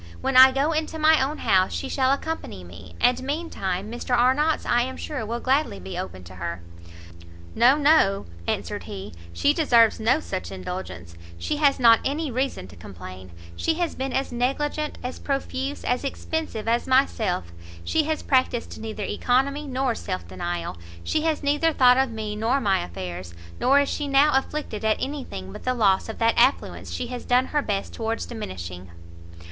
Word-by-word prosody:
When 270 - -1
I 260 +1 +10
go 275 +4 +1
into 315 0 -2
my 310 -2 +5
own 295 +3 -2
house, 185 -1 +2
she 275 - -3
shall 265 -1 +1
accompany 280 - -3
me, 85 0 -12
and 245 +1 +3
mean 305 +6 -3
time 190 +2 -3
Mr 240 +1 -1
Arnott's 280 +6 +2
I 240 - +3
am 260 +1 -3
sure 295 -7 -4
will 235 +2 -3
gladly 265 - +1
be 95 +1 -7
open 95 0 -6
to 90 +2 -12
her." 85 -1 -5 0.9
"No, 255 +4 +5
no," 290 -10 +4 0.2
answered - - -3
he, 95 +1 -7 0.2
"she 285 - +2
deserves 235 -9 +4
no 230 +7 +3
such 190 -11 -5
indulgence; 180 - -7 0.2
she 295 - -2
has 285 -3 +3
not 230 -2 +7
any 290 +1 -2
reason 255 - -2
to - - -13
complain, 95 +1 -10 0.3
she 325 - 0
has 345 -1 -1
been 265 0 -3
as 270 0 -1
negligent, 290 +5 -1
as 250 +1 -5
profuse, 275 0 -3
as 250 +2 0
expensive 280 -5 -4
as 235 +1 +1
myself; 225 - +1 0.3
she 315 -2 +1
has 315 0 -2
practised 255 -4 0
neither 220 -1 -5
oeconomy 275 +8 0
nor 260 -2 0
self 90 - -5
denial, 85 -1 -4 0.3
she 310 - 0
has 315 -2 0
neither 295 +3 +2
thought 250 -3 +6
of 265 -1 +2
me 215 -2 -4
nor 230 +6 +1
my 195 -6 +2
affairs, 90 0 -7 0.2
nor 270 +3 +5
is 285 - 0
she 295 - -2
now 280 +2 +5
afflicted 265 -5 -2
at 220 0 +2
any 280 +1 -3
thing 95 - -8
but - - -9
the 255 0 0
loss 200 -3 +2
of 220 - -6
that 230 0 +3
affluence 255 +4 +2
she - - -3
has 245 0 -6
done 250 +1 +3
her 295 - +3
best 200 -6 -3
towards 225 0 -3
diminishing. 90 - -7
250 Hz, 185 wpm, -24 LUFS, 190-280 Hz, 0.9 s, I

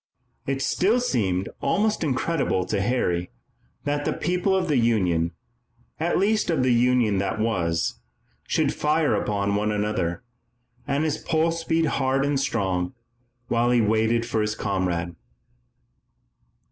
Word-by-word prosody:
It 135 0 -1
still 215 +7 +2
seemed 100 - 0
almost 215 -2 +1
incredible 135 - 0
to 100 +1 -1
Harry 90 -6 0 0.5
that 145 0 -1
the - - 0
people 180 +3 0
of 185 -1 0
the 150 -4 +2
Union 90 -8 +2 0.7
at 165 +2 +1
least 210 +2 +1
of 155 -6 +2
the 130 -1 +3
Union 120 -4 +3
that 100 +2 -2
was 85 -7 0 0.5
should - - +1
fire 150 -3 +1
upon 100 -1 0
one 105 +1 0
another, 105 -3 -1 0.6
and 140 +2 0
his 155 -1 -1
pulse 165 0 0
beat 165 0 +1
hard 135 -2 +1
and 140 -1 +1
strong, 95 -7 -1 0.5
while 120 0 +1
he 125 -1 +4
waited 110 +1 +2
with 110 - +2
his 105 0 -1
comrade. 90 -4 -2
120 Hz, 135 wpm, -24 LUFS, 100-155 Hz, 0.7 s, he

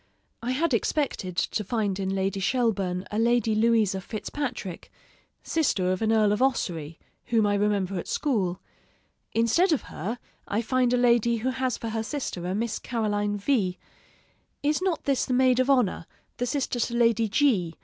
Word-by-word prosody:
I 235 - -3
had 305 +2 0
expected 225 - -1
to 210 - 0
find 205 -2 -1
in 190 -1 -1
Lady 195 0 -1
Shelburne 195 -5 0
a 210 - -1
Lady 235 -1 +2
Louisa 215 -3 +2
Fitzpatrick, 225 - -5 0.5
sister 205 - +1
of 185 - -2
an 220 0 +2
Earl 215 -2 +4
of 210 - 0
Ossory, 170 - -1 0.3
whom 230 -3 +2
I 205 - +2
remember 200 -2 0
at - - -7
school; 195 - 0 0.7
instead 230 - +3
of 305 - +1
her, 215 +10 -4 0.3
I 215 +3 -1
find 255 +1 +1
a 250 - +3
lady 235 -1 +3
who 250 +4 -1
has 260 -1 -1
for 230 - -5
her 220 0 -2
sister 220 - -4
a 185 - -1
Miss 220 +1 -2
Caroline 205 -3 -1
V: 200 -5 0 0.9
is 300 +3 +1
not 370 -4 -1
this 275 -3 +1
the 255 - 0
maid 255 0 +4
of 255 +1 +2
honor, 245 -11 +2 0.3
the 245 - -1
sister 255 -2 -1
to 235 +1 -1
Lady 230 -2 +3
G 200 - +2
225 Hz, 170 wpm, -26 LUFS, 195-250 Hz, 0.9 s, Earl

